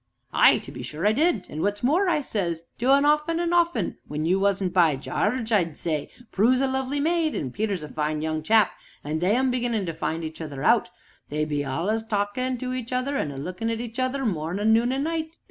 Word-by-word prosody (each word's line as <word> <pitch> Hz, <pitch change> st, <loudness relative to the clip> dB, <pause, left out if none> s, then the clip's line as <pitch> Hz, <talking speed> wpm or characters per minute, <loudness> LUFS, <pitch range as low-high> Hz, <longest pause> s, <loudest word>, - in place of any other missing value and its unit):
"Ay, -, -, +6 dB
to -, -, -9 dB
be -, -, -8 dB
sure 155 Hz, +4 st, -5 dB
I 210 Hz, -, +5 dB
did; 305 Hz, -, +1 dB
an' 155 Hz, -, -5 dB
what's 205 Hz, +3 st, -1 dB
more, 345 Hz, +9 st, +3 dB
I 310 Hz, -3 st, +2 dB
says 170 Hz, -, -2 dB, 0.2 s
to 250 Hz, +3 st, +3 dB
un 280 Hz, +1 st, +5 dB
often 300 Hz, +3 st, +2 dB
an' 345 Hz, 0 st, 0 dB
often, 340 Hz, -, +1 dB
when 150 Hz, +1 st, -3 dB
you 185 Hz, +3 st, +2 dB
wasn't 195 Hz, -2 st, +1 dB
by: 170 Hz, -6 st, +4 dB
'Jarge,' 220 Hz, -, -2 dB
I'd 170 Hz, -8 st, +1 dB
say, 155 Hz, -3 st, -2 dB, 0.2 s
'Prue's 240 Hz, +6 st, +3 dB
a 270 Hz, -, +2 dB
lovely 265 Hz, +1 st, -1 dB
maid, 320 Hz, +1 st, +1 dB
an' 130 Hz, -4 st, -3 dB
Peter's 200 Hz, -, -2 dB
a -, -, -6 dB
fine 150 Hz, 0 st, -2 dB
young 155 Hz, 0 st, -1 dB
chap, 215 Hz, +4 st, +4 dB, 0.3 s
an' 150 Hz, +2 st, -2 dB
they 185 Hz, +6 st, +2 dB
'm 260 Hz, 0 st, +2 dB
beginnin' 240 Hz, -5 st, -1 dB
to 165 Hz, -, -3 dB
find 160 Hz, +2 st, -3 dB
each 160 Hz, +1 st, -6 dB
other 145 Hz, -4 st, -6 dB
out, -, -, +4 dB, 0.4 s
they 150 Hz, +1 st, -1 dB
be 145 Hz, -1 st, -1 dB
all'us 170 Hz, +12 st, -1 dB
a 220 Hz, -, -17 dB
talkin' 220 Hz, +5 st, -1 dB
to 255 Hz, +1 st, -4 dB
each 255 Hz, -2 st, -5 dB
other 255 Hz, +3 st, -1 dB
an' 155 Hz, -, -1 dB
a 140 Hz, -, -7 dB
lookin' 180 Hz, +10 st, -4 dB
at 230 Hz, -1 st, -2 dB
each 235 Hz, +1 st, -6 dB
other, 260 Hz, +1 st, -1 dB
mornin', 195 Hz, +3 st, +1 dB
noon 235 Hz, +2 st, +3 dB
an' 270 Hz, +1 st, -1 dB
night!' 320 Hz, 0 st, -3 dB
215 Hz, 230 wpm, -25 LUFS, 165-260 Hz, 0.4 s, Ay